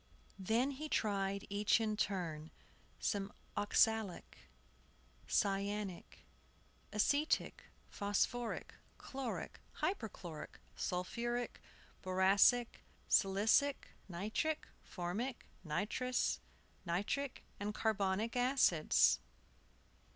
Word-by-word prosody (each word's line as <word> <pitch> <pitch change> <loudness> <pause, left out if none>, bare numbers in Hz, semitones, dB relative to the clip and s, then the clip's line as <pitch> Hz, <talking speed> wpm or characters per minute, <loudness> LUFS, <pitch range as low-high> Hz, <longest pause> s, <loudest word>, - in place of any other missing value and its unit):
Then 230 +8 +2
he 300 +3 -6
tried, 200 -4 0
each 205 +3 +3
in 215 -1 0
turn, 170 -7 -2 0.5
some 200 -1 -1 0.2
oxalic, 215 -1 +1 0.9
cyanic, 200 -1 -1 0.7
acetic, 285 +8 +1 0.2
phosphoric, 205 +4 -1 0.2
chloric, 265 -3 -5
hyperchloric, 195 - -4 0.2
sulphuric, 235 +7 -2 0.4
boracic, 195 +6 +4 0.2
silicic, 215 +9 +3 0.2
nitric, 215 - -1
formic, 205 +9 -4 0.2
nitrous 210 +10 0 0.4
nitric, 205 +10 -2 0.2
and 210 +1 -3
carbonic 215 +1 0
acids. 245 - +4
205 Hz, 70 wpm, -37 LUFS, 190-240 Hz, 0.9 s, boracic